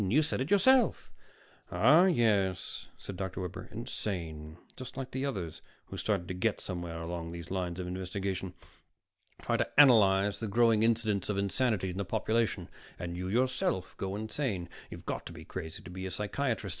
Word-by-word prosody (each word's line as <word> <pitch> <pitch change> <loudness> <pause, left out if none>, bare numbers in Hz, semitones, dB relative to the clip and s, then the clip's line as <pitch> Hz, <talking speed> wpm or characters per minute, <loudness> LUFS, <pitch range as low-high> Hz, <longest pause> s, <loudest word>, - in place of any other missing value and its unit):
You 150 +9 +4
said 145 -4 -1
it 135 - -2
yourself." 235 +5 +4 0.6
"Ah, 155 - +6
yes," 105 - +1
said 95 - -7
Dr. 95 0 -3
Webber. 90 +3 -6
"Insane. 85 -9 -5 0.2
Just 130 0 -8
like 130 -1 -4
the 130 +2 -1
others 90 - -4 0.2
who - - -8
started 100 -5 0
to - - -3
get 95 +4 0
somewhere 85 -3 -5
along 85 0 -4
those 85 0 -7
lines 90 -2 -2
of 90 - -3
investigation. 95 0 -3 0.9
Try - - +1
to - - 0
analyze 105 -7 +6
the 110 - -2
growing 115 +1 +4
incidence 110 -4 +2
of 105 - 0
insanity 100 -1 +1
in 90 - -7
the 100 - 0
population 110 -2 0 0.3
and 85 0 -4
you 90 +1 -3
yourself 115 -4 0
go 95 0 -3
insane. 110 -4 -2 0.2
You've - - -9
got - - -3
to - - -8
be - - -10
crazy 80 0 -6
to 85 - -9
be 95 +1 -5
a - - -3
psychiatrist. 105 +3 -2
100 Hz, 175 wpm, -31 LUFS, 90-115 Hz, 0.9 s, Ah